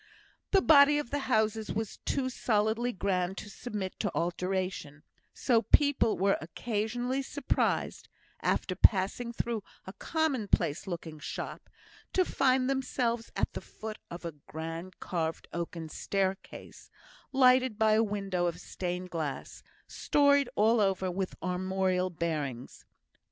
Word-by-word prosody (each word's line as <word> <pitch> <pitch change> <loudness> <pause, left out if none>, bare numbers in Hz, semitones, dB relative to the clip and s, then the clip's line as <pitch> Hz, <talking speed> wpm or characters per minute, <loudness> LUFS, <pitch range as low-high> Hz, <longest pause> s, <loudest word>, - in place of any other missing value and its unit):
The 390 -2 +4
body 295 -1 +7
of 295 -5 -3
the 290 - 0
houses 220 -2 +1
was 220 -1 -3
too 270 -2 0
solidly 230 -1 +1
grand 190 -2 -1
to 205 - -7
submit 205 -4 -5
to 205 - -1
alteration; 175 -3 -2 0.3
so 235 -3 +2
people 285 -4 +3
were 195 +2 +2
occasionally 235 +9 -2
surprised, 280 0 -1 0.3
after - - 0
passing 205 +4 +3
through 235 -1 -2 0.2
a 190 - -8
commonplace 255 - 0
looking 165 -3 -6
shop, 140 - -6 0.4
to 370 - +3
find 255 -4 +2
themselves 250 -3 -1
at - - 0
the - - -5
foot 215 0 -8
of 170 0 -8
a 165 - -4
grand 165 +3 -6
carved 165 -2 -3
oaken 170 -1 -4
staircase, 190 +4 -3 0.4
lighted 255 -3 +4
by 220 -1 +4
a 215 +1 +5
window 195 -4 -1
of 170 0 -3
stained 180 0 -4
glass, 155 -5 -4 0.2
storied 285 -2 +3
all 225 +2 +4
over 190 -2 +1
with 185 +1 -3
armorial 185 0 0
bearings. 155 -7 -4
200 Hz, 130 wpm, -30 LUFS, 180-245 Hz, 0.4 s, body